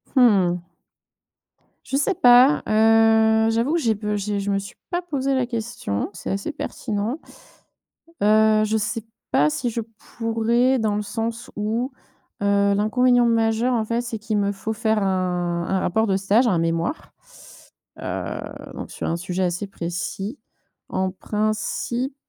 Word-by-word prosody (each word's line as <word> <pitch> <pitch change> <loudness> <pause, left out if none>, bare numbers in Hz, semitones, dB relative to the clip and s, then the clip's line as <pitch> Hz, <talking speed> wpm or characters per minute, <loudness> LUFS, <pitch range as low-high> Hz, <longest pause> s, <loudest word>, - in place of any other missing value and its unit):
Mmh. 190 -9 +4 1.2
Je 270 - -1
sais 295 +8 +1
pas, 250 -1 +6
heu, 220 0 +4
j'avoue 230 +6 +1
que 340 - +2
j'ai 230 -8 +2
pe 210 0 -3
j'ai 205 0 -2
je 200 0 -3
me 195 - +1
suis 195 0 -7
pas 350 -1 -1
posé 275 -6 -1
la 260 -1 +1
question. 225 - -3
C'est 175 - -7
assez 195 +10 -3
pertinent, 225 +2 -3 1.0
heu, 215 +1 +4
je 215 +1 -1
sais 220 +1 -3 0.3
pas 150 +1 +4
si 240 - -2
je 235 - -3 0.4
pourrais, 235 +3 +2
dans 215 -3 0
le - - -1
sens 225 +4 -4
où, 225 +5 -1 0.5
heu, 200 0 +3
l'inconvénient 245 +4 +3
majeur, 230 +1 +2
en 225 -2 0
fait, 230 +2 -1
c'est 235 -2 -5
qu'il 215 -1 -1
me 200 0 +1
faut 210 +2 -4
faire 220 0 0
un 180 -3 -1
un 190 - +1
rapport 220 +5 +1
de 195 -3 +1
stage, 200 +6 +3
un 185 -7 +2
mémoire, 165 - -2 0.9
heu, - - -4 0.3
donc - - -7
sur - - -5
un 165 - 0
sujet 180 +1 -2
assez 180 +3 -1
précis. 195 +6 -5 0.5
En 185 0 -1
principe, 215 +6 -2
220 Hz, 155 wpm, -23 LUFS, 195-235 Hz, 1.2 s, pas